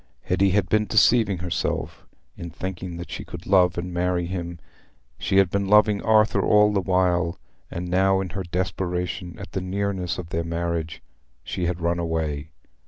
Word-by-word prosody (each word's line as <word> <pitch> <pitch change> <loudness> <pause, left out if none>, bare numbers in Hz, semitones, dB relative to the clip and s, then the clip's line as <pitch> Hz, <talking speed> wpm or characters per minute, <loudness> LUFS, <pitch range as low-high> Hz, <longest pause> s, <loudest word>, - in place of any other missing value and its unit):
Hetty 100 0 +2
had 95 -1 +2
been 105 0 +2
deceiving 110 -1 +4
herself 85 -1 -3 0.3
in 85 - -7
thinking 90 0 -6
that 85 - -8
she - - -5
could - - -9
love 90 -3 +4
and 90 +1 -4
marry 90 0 0
him: 85 -1 -5 0.6
she 95 - 0
had 95 -2 +4
been 100 0 0
loving 105 0 +4
Arthur 110 0 +3
all 105 0 +4
the 100 - +2
while; 90 -2 +1 0.3
and 90 +1 -5
now, 95 +2 +3
in 95 -1 -3
her 95 +3 -4
desperation 90 -1 -3
at - - -9
the 95 - -2
nearness 95 -1 -2
of 90 -2 -7
their 85 -1 -1
marriage, 85 -1 -3 0.4
she 90 -2 -3
had 90 -1 -3
run 85 +1 0
away. 80 -3 -2
90 Hz, 170 wpm, -24 LUFS, 85-95 Hz, 0.6 s, deceiving